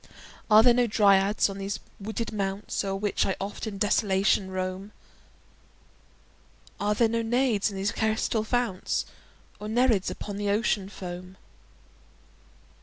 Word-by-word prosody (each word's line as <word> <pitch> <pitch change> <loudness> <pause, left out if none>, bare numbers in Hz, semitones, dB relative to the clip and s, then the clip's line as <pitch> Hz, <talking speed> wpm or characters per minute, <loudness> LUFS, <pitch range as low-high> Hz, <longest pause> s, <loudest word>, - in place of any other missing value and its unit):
Are 215 +1 +8
there 245 0 +6
no 245 0 +2
Dryads 200 -1 +4
on 195 -1 -7
these 195 +1 -3 0.2
wooded 220 +2 -4
mounts 200 0 -2
O'er 195 -1 -2
which 205 +1 0
I 195 - 0
oft 200 +3 -5
in 205 -2 -5
desolation 195 -1 +2
roam? 185 +2 -4 1.9
Are 210 +1 +1
there 230 +1 +4
no 230 +1 -1
Naiads 230 -2 +1
in 200 - -7
these 195 +1 0
crystal 220 0 0
founts? 235 -4 -1 0.5
Nor 210 - -6
Nereids 230 -4 +2
upon 205 -1 -6
the 205 0 -1
Ocean 205 -2 0
foam? 185 -1 -8
205 Hz, 135 wpm, -27 LUFS, 195-220 Hz, 1.9 s, Are